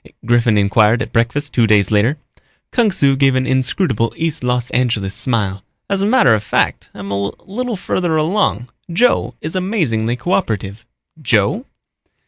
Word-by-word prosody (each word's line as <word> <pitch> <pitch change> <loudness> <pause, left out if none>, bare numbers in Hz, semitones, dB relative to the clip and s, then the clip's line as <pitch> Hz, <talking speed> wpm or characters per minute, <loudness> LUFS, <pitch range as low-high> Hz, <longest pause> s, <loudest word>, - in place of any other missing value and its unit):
Griffin 120 -2 +3
inquired 105 +3 +3
at - - -10
breakfast 130 +6 -1
two 115 -2 +3
days 105 -2 +3
later. 110 +8 +2 0.5
Kung 235 -4 +2
Su 140 -8 +2
gave 135 -1 +3
an 130 0 +1
inscrutable 130 - 0
East 160 -5 -2
Los 125 0 -1
Angeles 115 -6 0
smile. 100 -7 -1 0.3
"As 195 -1 0
a 200 - +1
matter 230 - +4
of 110 - +1
fact, 105 - -1
I'm 100 -1 -7
a 100 0 -1 0.2
little 240 +4 -4
farther 180 -3 -1
along. 155 - 0 0.2
Joe 170 - +1
is 160 +4 -5
amazingly 145 - -1
coöperative." 110 - -2 0.4
"Joe?" 115 - +1
125 Hz, 150 wpm, -17 LUFS, 110-170 Hz, 0.5 s, matter